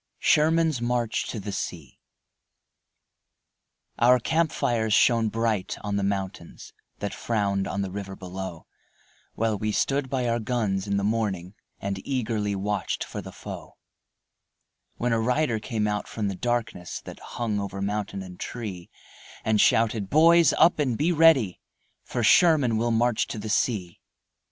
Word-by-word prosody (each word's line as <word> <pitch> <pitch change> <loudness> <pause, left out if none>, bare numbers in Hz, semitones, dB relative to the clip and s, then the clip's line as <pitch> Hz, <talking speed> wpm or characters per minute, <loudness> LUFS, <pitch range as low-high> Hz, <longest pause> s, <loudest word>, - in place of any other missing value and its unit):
SHERMAN'S 160 -3 +3
MARCH 120 -1 -1
TO 115 - -4
THE 100 +1 -5
SEA 85 -7 -6 2.0
Our 125 +2 +6
camp 160 +6 +1
fires 110 -3 +1
shone 115 -2 +4
bright 115 -3 -1
on 105 -1 -3
the 100 - 0
mountains 95 -3 -4 0.2
That 100 - -4
frowned 100 -4 -1
on 100 +1 -2
the 95 - -5
river 95 0 -6
below, 95 -2 -7 0.7
While 110 -2 0
we 110 +1 -1
stood 135 +4 0
by 130 -2 -1
our 115 0 +1
guns 105 -4 -1
in 100 0 0
the 100 - -1
morning 100 -4 -1 0.3
And 100 -1 -3
eagerly 110 -6 -1
watched 100 +1 -2
for - - -6
the - - -9
foe - - -9 1.2
When 120 0 0
a 115 - +1
rider 125 0 +1
came 110 -1 -2
out 105 -1 -2
from 105 -3 -3
the 95 - -4
darkness 115 -5 -2
That - - -10
hung 110 -4 -3
over 100 -1 -5
mountain 100 -1 -3
and 90 -1 -11
tree, 100 -8 -6 0.6
And 110 -1 +3
shouted, 110 -3 +2
"Boys, 165 +2 +6
up 170 -1 +4
and 130 -6 0
be 160 +4 +2
ready, 155 - +4 0.4
For 120 - -3
Sherman 145 -4 +5
will 120 +2 +1
march 120 0 +1
to - - -6
the 110 +1 -5
sea." 100 -6 -1
110 Hz, 150 wpm, -26 LUFS, 100-120 Hz, 2.0 s, Our